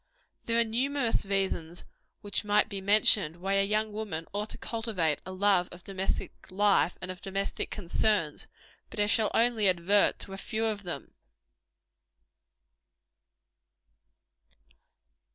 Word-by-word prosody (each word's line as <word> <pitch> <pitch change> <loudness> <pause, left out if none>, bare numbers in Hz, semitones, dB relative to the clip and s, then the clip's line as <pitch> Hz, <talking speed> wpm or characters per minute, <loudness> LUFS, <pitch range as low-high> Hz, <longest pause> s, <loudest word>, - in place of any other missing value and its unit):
There 230 0 +1
are - - +5
numerous 240 0 0
reasons 190 -4 -2 0.4
which 205 +1 -1
might 210 0 +2
be 200 -1 -5
mentioned, 200 -4 +4
why 195 +3 -2
a 195 0 +3
young 215 +1 0
woman 205 -7 -4
ought 210 +1 -3
to - - -5
cultivate 215 -10 -2
a - - -5
love 185 -1 +2
of 175 0 -12
domestic 195 -1 -3 0.2
life, 195 -2 +2
and 185 - -3
of 180 - -10
domestic 195 +1 -3
concerns; 185 -4 0 0.4
but - - -7
I 205 - +4
shall 215 +1 +2
only 225 -4 +4
advert 185 +3 +3
to 195 - -5
a - - -6
few 220 +2 -2
of 215 -2 -1
them. 175 -8 -7
200 Hz, 135 wpm, -29 LUFS, 185-215 Hz, 0.4 s, are